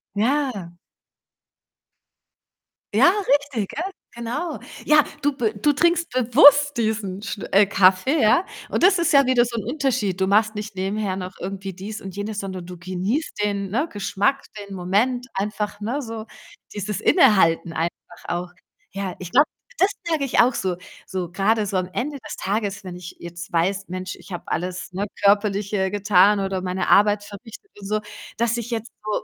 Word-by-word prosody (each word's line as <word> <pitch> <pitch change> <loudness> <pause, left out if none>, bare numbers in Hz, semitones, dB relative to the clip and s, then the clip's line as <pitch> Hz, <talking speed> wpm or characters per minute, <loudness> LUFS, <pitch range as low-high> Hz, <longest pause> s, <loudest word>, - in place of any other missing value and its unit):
Ja. 225 -6 0 2.2
Ja, 355 - +6 0.3
richtig, 255 -9 -4
gell? 355 +7 -4 0.2
Genau. 245 +8 -4 0.3
Ja, 300 -1 +6 0.2
du 290 - +3
b 225 -4 0
du 295 +8 +3
trinkst 340 +3 +2
bewusst 285 +3 +6
diesen 215 -4 -2
Schn 200 -1 -5
äh, 200 +2 +6
Kaffee, 195 +9 +3
ja. 225 - +4 0.2
Und - - -1
das 370 0 +6
ist 335 0 +2
ja 280 -1 +6
wieder 250 -1 +4
so 235 0 -5
'n - - -5
Unterschied. 235 - -1
Du 190 - +3
machst 215 +2 +3
nicht 210 -1 -6
nebenher 195 +1 -2
noch 185 0 -5
irgendwie 195 0 -5
dies 205 +4 -7
und 195 -1 -8
jenes, 205 +1 -4
sondern 185 -3 -6
du 180 - -9
genießt 185 - -3
den, 200 -1 -1
ne, 280 +10 0
Geschmack, 205 +6 0 0.2
den 200 -1 -8
Moment 215 +8 0
einfach, 210 +1 -3
ne, 255 +7 -2
so 225 -2 -7 0.5
dieses 205 0 -4
Innehalten 165 -4 +4
einfach 170 +1 -5
auch. 175 0 -3 0.4
Ja, 195 -2 -4
ich 180 -1 -8
glaube, 285 +4 +5 0.3
das 380 - +5 0.2
merke 320 -4 0
ich 265 - 0
auch 245 +1 +5
so, 185 -6 -1 0.3
so 180 -3 -4
grade 210 +3 +1
so 195 -1 -1
am 185 0 -2
Ende 285 +3 -3
des - - -7
Tages, 200 0 -2
wenn 180 -2 -7
ich 180 -1 -9
jetzt 170 +2 -9
weiß: 190 +4 0
„Mensch, 185 +1 -5
ich - - -15
habe 175 - -5
alles, 180 +2 -4
ne, 200 +3 -2 0.2
Körperliche 200 -1 +2
getan, 205 0 +4
oder 195 -1 -2
meine 185 0 -2
Arbeit 205 0 +5
verrichtet 225 - -12
und 195 - -7
so, 215 +1 0 0.4
dass 235 0 +1
ich 235 0 -5
jetzt 230 -1 -4
so 215 - -5
205 Hz, 170 wpm, -23 LUFS, 190-240 Hz, 2.2 s, Ja